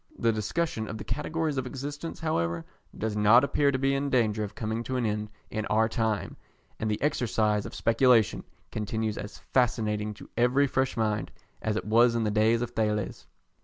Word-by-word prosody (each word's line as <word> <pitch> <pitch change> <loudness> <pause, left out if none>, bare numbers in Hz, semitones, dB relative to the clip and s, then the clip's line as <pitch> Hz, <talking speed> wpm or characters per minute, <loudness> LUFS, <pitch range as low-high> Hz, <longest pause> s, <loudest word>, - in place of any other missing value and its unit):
The 115 - +2
discussion 110 - -2
of 105 - -5
the - - -6
categories 155 0 -2
of 130 -1 -1
existence, 145 +6 -6
however, 85 - -1 0.3
does 110 -1 -2
not 105 +4 +6
appear 140 0 +2
to 130 - 0
be 135 +1 +1
in 140 +1 0
danger 110 -5 +2
of 105 0 -6
coming 110 +1 -2
to 130 - -3
an 125 - 0
end 105 0 -2 0.2
in 110 0 -2
our 110 +1 +3
time, 110 -2 -1 0.4
and 110 - -1
the 105 - -1
exercise 110 -7 +1
of - - -10
speculation 115 -2 +3 0.3
continues 110 0 -2
as 105 - -7
fascinating 105 -4 0
to - - -12
every 125 +4 +3
fresh 130 -2 0
mind 110 -1 0 0.3
as 110 - -1
it 110 - -2
was 115 +2 +4
in 115 - +1
the 105 - 0
days 110 +2 +3
of 120 - -4
Thales. 105 -3 -2
110 Hz, 190 wpm, -28 LUFS, 105-130 Hz, 0.4 s, not